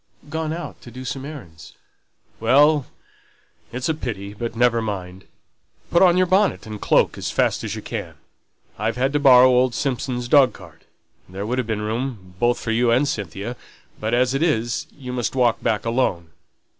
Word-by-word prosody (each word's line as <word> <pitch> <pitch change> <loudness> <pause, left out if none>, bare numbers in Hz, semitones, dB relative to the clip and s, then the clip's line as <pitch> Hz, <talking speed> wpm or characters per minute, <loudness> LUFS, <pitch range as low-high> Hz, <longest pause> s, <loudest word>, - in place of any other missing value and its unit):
"Gone 160 -1 -2
out 160 -4 -6
to - - -11
do 130 +2 -9
some 135 +1 -4
errands 105 - -11 0.3
" - - -40
"Well, 145 +5 +4 0.8
it's 125 +2 -3
a 160 - +1
pity 105 -9 -5
but 115 +2 -5
never 120 -1 +3
mind. 95 -3 -5 0.7
Put 170 - +4
on 180 -2 +6
your 185 - +4
bonnet 190 +3 +2
and 105 -1 -8
cloak - - +2
as - - -3
fast - - 0
as - - -4
you - - -7
can. - - -6 0.6
I've 110 +3 -1
had 135 +2 0
to 145 - +2
borrow 130 -3 +7
old 125 -1 +3
Simpson's 125 -3 -2
dog 130 -3 +5
cart, 90 -4 -15 0.4
there 95 +2 -5
would 125 +4 -1
have 125 - -2
been 105 -2 -2
room 110 -4 -4
both 120 0 +2
for 115 - -3
you 120 +1 +2
and 130 +5 +3
Cynthia; 105 - -4 0.4
but 110 +2 0
as 125 +1 +2
it 135 - -1
is, 120 -8 0
you 125 -3 -7
must 125 +1 -2
walk 120 -3 +2
back 110 0 -1
alone. 105 -9 -1
120 Hz, 185 wpm, -22 LUFS, 110-135 Hz, 0.8 s, borrow